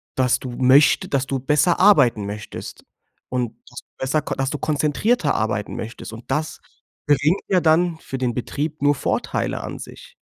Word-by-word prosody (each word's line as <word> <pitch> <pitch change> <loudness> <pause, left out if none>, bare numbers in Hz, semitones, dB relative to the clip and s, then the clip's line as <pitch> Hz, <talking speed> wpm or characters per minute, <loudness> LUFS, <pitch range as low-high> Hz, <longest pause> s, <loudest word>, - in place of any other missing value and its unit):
dass 130 -1 +2
du 130 - -7
möchte 130 +4 +4
dass 135 -1 0
du 135 -1 -2
besser 150 +6 +2
arbeiten 125 - +5
möchtest 105 +1 -8 0.5
und 125 -3 -1 0.2
dass 120 - -9
du - - -62
besser 135 +4 0
ko - - -4
dass 135 0 -1
du 150 - -3
konzentrierter 155 - 0
arbeiten 105 -1 -2
möchtest. 115 0 -7
Und 115 +1 -11
das 155 +1 -2 0.5
bringt 150 +6 +2
ja 185 -3 +2
dann 165 +1 +2
für 135 - -6
den 125 -2 -1
Betrieb 145 +5 -4
nur 145 0 +3
Vorteile - - -2
an - - -6
sich. - - -11
140 Hz, 175 wpm, -21 LUFS, 125-155 Hz, 0.5 s, arbeiten